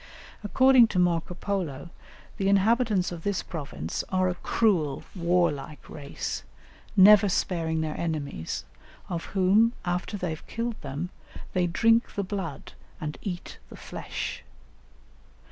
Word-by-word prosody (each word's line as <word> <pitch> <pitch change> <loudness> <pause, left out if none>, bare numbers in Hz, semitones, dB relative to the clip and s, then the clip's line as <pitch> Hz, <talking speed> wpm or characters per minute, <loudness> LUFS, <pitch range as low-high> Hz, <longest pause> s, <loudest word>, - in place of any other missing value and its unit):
According 260 +3 +6
to 195 - -4
Marco 175 -1 +1
Polo, 170 -6 -3 0.5
the 195 0 +1
inhabitants 205 -1 +3
of 170 -2 -6
this 200 +1 -1
province 140 - -5
are 185 -1 +2
a - - 0
cruel 175 -7 +1
warlike 170 -5 0
race, 145 -2 -5 0.6
never 205 +1 +8
sparing 165 -3 0
their 155 -1 -2
enemies, 150 - -3 0.4
of 170 -2 -3
whom, 200 +5 +3
after 180 +4 -2
they 180 -4 -2
have 160 - -8
killed 230 0 -3
them, 160 +7 -5 0.4
they 180 -2 +2
drink 225 +7 +3
the 200 - 0
blood 185 -7 -5 0.3
and 150 -1 -5
eat 180 -3 -6
the - - -11
flesh. - - -5
180 Hz, 130 wpm, -27 LUFS, 160-200 Hz, 0.6 s, never